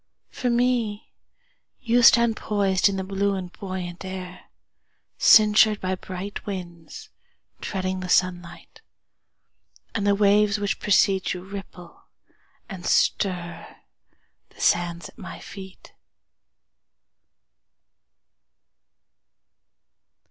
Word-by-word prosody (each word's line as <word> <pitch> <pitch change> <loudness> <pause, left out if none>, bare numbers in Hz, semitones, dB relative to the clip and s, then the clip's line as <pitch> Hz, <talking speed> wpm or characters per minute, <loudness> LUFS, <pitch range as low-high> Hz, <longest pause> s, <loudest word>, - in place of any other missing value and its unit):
For 250 - -2
me, 235 -3 0 0.7
You 240 -1 +2
stand 235 -1 +6
poisedIn 200 -2 +1
the 190 - -3
blue 200 +1 -1
and 180 -2 -6
buoyant 185 -3 -6
air, 185 -1 -8 0.7
Cinctured 215 -1 +6
by 185 0 -2
bright 185 +2 -7
winds, 185 - -8 0.5
Treading 185 -1 -3
the 185 -1 -6
sunlight. 180 - -1 1.1
And 205 -2 -1
the 200 - +4
waves 205 0 +3
which 205 -1 -2
precede 195 -2 +2
youRipple 185 -1 -7 0.7
and 190 -5 -9
stirThe 175 -3 -1 0.8
sands 175 -1 0
at - - -20
my - - -9
feet. 190 -1 -12
195 Hz, 85 wpm, -24 LUFS, 185-210 Hz, 1.1 s, stand